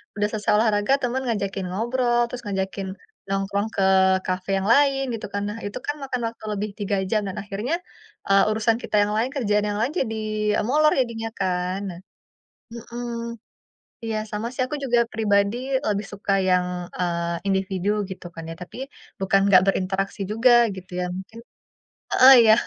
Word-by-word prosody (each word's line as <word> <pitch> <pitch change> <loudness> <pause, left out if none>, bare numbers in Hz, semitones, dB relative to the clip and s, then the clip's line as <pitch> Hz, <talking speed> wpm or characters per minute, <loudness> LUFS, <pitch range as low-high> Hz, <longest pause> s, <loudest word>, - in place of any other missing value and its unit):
udah 205 0 +1
selesai 215 -1 -1
olahraga 210 +1 +2
temen 255 +1 -1
ngajakin 200 -4 -2
ngobrol, 240 +4 +1
terus 245 0 -6
ngajakin 195 -1 -3 0.4
nongkrong 195 +2 -1
ke 195 - +1 0.4
kafe 185 +1 -3
yang 190 - -2
lain 275 -1 +3
gitu 225 - -4
kan. 200 - -1
Nah, 210 - -5
itu 205 - -5
kan 290 - -1
makan 255 -2 -3
waktu 230 - -18
lebih 210 +1 -2
3 200 -1 0
jam 215 0 +2
dan 185 - -7
akhirnya, 205 +8 -3 0.5
eee, 195 0 +5
urusan 220 +1 +2
kita - - -3
yang 210 +1 -1
lain, 230 +4 +1
kerjaan 210 -5 +1
yang 205 - -2
lain 255 +6 0
jadi 225 -4 -2 0.5
molor 305 +5 +4
jadinya 225 -2 -3
kan. 180 0 -1
Nah 170 - -10 0.7
mhm, 235 +1 -7 1.0
iya 225 -1 -2
sama 210 +2 -3
sih 255 - -5
aku 300 - -4
juga 245 -2 +2
pribadi 205 0 +2 0.3
lebih 205 0 0
suka 200 0 -2 0.2
yang, 180 -1 +3 0.3
eee, 170 -1 -1
individu 190 0 -1 0.2
gitu 190 - -8
kan 165 - -7
ya. - - -5
Tapi 180 - -9 0.4
bukan 195 +1 +3
nggak 185 -2 +7
berinteraksi 195 +1 -1
juga 230 +4 +4 0.3
gitu 185 0 -11
ya, - - 0
mungkin 205 +4 -9 0.7
heeh, 260 +1 +8
iya 220 -1 +7
205 Hz, 165 wpm, -24 LUFS, 195-235 Hz, 1.0 s, heeh